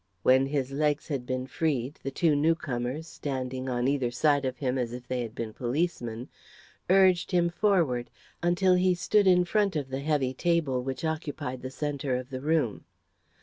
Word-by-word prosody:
When 130 +1 +5
his 135 -2 -2
legs 150 +2 0
had 135 -4 -3
been 130 0 -2
freed, 140 -2 -2
the 135 - -3
two 155 +2 +2
newcomers, 145 -2 0
standing 130 -4 -4
on 120 0 0
either 135 -3 +1
side 140 +3 +2
of 130 0 -2
him 130 -2 -1
as 120 -1 -2
if 125 0 -8
they 125 -1 -1
had 115 -1 -6
been 115 -3 -4
policemen, 125 -3 -2 0.6
urged 185 -2 +4
him 175 -2 +2
forward, 170 - +1 0.3
until 175 +2 +3
he 180 0 +3
stood 205 +3 +2
in 180 -1 +5
front 200 0 +1
of 140 -3 -2
the 130 +1 -3
heavy 140 -3 0
table 155 -4 +1
which 130 +4 -4
occupied 145 -5 -3
the 130 - -5
centre 140 -1 -2
of 130 +1 -5
the 130 -1 -4
room. 150 -7 0
140 Hz, 180 wpm, -28 LUFS, 130-165 Hz, 0.6 s, When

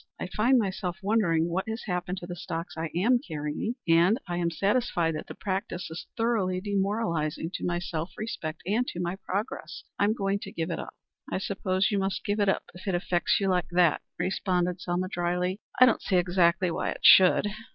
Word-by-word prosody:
I - - -3
find 245 +5 +4
myself 190 -5 -1
wondering 185 -6 +2
what 190 +5 -2
has 220 +2 -4
happened 180 -1 -2
to - - -6
the 175 0 -6
stocks 170 -1 -5
I 160 0 -3
am 235 +8 +3
carrying, 155 +6 -4
and 170 +6 +5
I 175 0 -2
am 170 -1 +1
satisfied 180 -1 +1
that 155 - -5
the - - -8
practice 190 -3 -3
is 160 - -7
thoroughly 215 -6 +1
demoralizing 190 -6 -1
to - - -4
my 175 0 0
self 170 -1 -3
respect 160 -8 -5
and 225 +7 +1
to 175 - -5
my 175 +1 -2
progress. 195 -4 -4 0.2
I 200 - +4
am 215 +2 +2
going 195 -2 0
to - - -8
give 165 +1 -3
it - - -3
up." - - -7 0.4
"I - - 0
suppose 190 0 0
you 200 - +1
must 195 0 -2
give 205 +1 0
it 200 -1 +3
up - - +1
if 180 +3 -12
it 190 - +1
affects 175 0 +1
you 195 - 0
like 180 -1 +1
that," 175 -3 +4 0.2
responded 180 0 0
Selma 180 +1 -1
drily. 180 +1 -1 0.2
"I 255 - +10
don't 240 - +2
see 190 - 0
exactly 175 0 +3
why - - -1
it - - -5
should." 185 +1 +8
185 Hz, 205 wpm, -28 LUFS, 175-200 Hz, 0.4 s, I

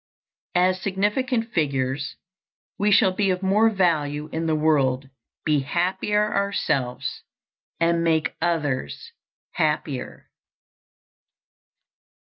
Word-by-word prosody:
As 185 +1 +3
significant 225 +5 0
figures, 135 -3 -1 0.6
we 205 +1 +2
shall 195 -2 +5
be 195 +1 0
of 185 +1 -1
more 210 +4 +4
value 155 -7 0
in 165 0 -1
the 160 - +2
world, 140 -4 +1 0.3
be 150 -2 +3
happier 190 +8 0
ourselves, 150 -11 -1 0.6
and 170 0 +2
make 160 -2 +1
others 145 - -2 0.4
happier. 150 -4 -2
165 Hz, 95 wpm, -24 LUFS, 145-195 Hz, 0.6 s, shall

